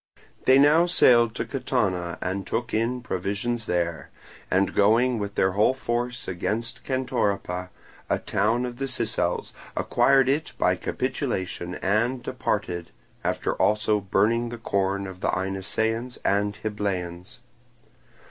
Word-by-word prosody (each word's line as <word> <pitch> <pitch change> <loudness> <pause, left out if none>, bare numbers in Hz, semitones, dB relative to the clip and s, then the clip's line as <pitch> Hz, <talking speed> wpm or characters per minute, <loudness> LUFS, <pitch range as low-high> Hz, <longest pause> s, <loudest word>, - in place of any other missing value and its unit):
They 130 - +7
now 150 +5 +6
sailed 120 -8 +5
to - - -2
Catana 95 -10 -1
and 95 +1 -3
took 120 +1 -2
in 115 +3 0
provisions 110 +3 -2
there, 85 -2 -1 0.4
and 95 +1 +2
going 115 +4 +3
with 100 -1 -4
their 95 - +3
whole 105 +7 +3
force 120 0 -3
against 100 +6 -3
Centoripa, 100 -8 -1 0.4
a - - +2
town 115 +5 0
of 120 -1 -6
the 135 +1 -2
Sicels, 115 -8 -1 0.2
acquired 135 +2 +4
it 145 +4 0
by - - +3
capitulation, 90 -1 -3
and 120 +6 0
departed, 85 -1 -2 0.3
after - - 0
also 105 0 +2
burning 110 +5 +1
the 120 - -6
corn 100 -3 -1
of 95 -1 -8
the - - 0
Inessaeans 110 +6 -1
and 100 +1 +1
Hybleans. 95 -5 -3
105 Hz, 130 wpm, -25 LUFS, 95-120 Hz, 0.4 s, They